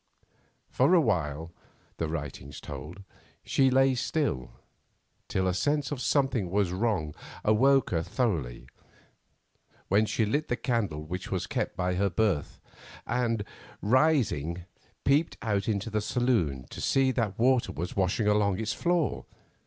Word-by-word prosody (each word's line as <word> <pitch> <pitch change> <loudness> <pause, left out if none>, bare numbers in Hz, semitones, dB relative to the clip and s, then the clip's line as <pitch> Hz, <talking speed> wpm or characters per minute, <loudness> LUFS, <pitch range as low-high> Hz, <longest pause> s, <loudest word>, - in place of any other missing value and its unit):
For 140 +8 +4
a - - +7
while, 80 - -1 0.5
the 80 - -1
writing 75 -3 -5
told, 75 +9 -8 0.4
she 135 -1 +3
lay 135 +1 +4
still, 125 - -1 0.8
till 95 0 0
a 90 - +1
sense 145 +8 0
that 145 - -4
something 130 - +1
was 100 -1 +1
wrong 95 -6 -1 0.3
awoke 135 +5 +4
her 80 - +1
thoroughly, 80 - -2 1.2
when 105 +3 +3
she 110 - +1
lit 145 +9 0
the 120 - 0
candle 110 - -1
which 90 +4 -5
she - - 0
kept - - -2
by 90 0 0
her 100 +2 +1
berth, 95 -5 0 0.5
and, 115 -4 0 0.4
rising, 105 - +2 0.4
peeped 145 +4 +2
out 100 -4 0
into 105 +1 -1
the 105 0 0
saloon 105 - 0
to - - -7
see 135 -1 +3
that 115 -7 -1
water 125 +1 +3
was 85 +3 -5
washing 95 +3 +1
along 105 -2 +2
its 110 -1 -1
floor. 175 -4 0
105 Hz, 140 wpm, -28 LUFS, 85-130 Hz, 1.2 s, a